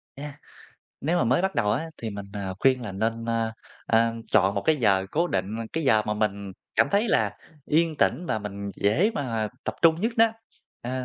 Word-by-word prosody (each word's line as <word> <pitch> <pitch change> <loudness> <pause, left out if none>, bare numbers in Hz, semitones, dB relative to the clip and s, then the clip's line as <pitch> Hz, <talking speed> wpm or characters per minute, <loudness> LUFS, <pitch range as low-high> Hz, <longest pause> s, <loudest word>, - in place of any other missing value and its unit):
A, 145 0 -8 0.6
nếu 165 +5 0
mà - - +2
mới 130 +9 +2
bắt 190 0 0
đầu 105 -4 +1
á 135 +9 -1 0.2
thì 115 - -3
mình, 100 -1 -7
ờ, 100 -2 -4
khuyên 130 -2 +3
là 100 - -5
nên, 115 +4 -2
ơ, 115 -1 -1 0.3
ờ, 115 0 +3 0.2
chọn 100 0 +4
một - - -1
cái 160 - +3
giờ 100 -7 +2
cố 170 +3 +1
định, 100 - -2
ơ, 115 - -3
cái 160 -1 -2
giờ 110 -5 +4
mà 105 - 0
mình 100 -2 -2 0.2
cảm - - +4
thấy 205 +3 +2
là 105 - +1 0.3
yên 160 0 +2
tĩnh 175 +3 +1
và 110 - 0
mình 100 -1 -6
dễ 150 - +2
mà 115 - -2 0.2
tập - - -2
trung 165 0 +5
nhất 225 +4 0
đó, 225 0 +7 0.6
ờ, 130 +1 -3
115 Hz, 215 wpm, -26 LUFS, 105-155 Hz, 0.6 s, đó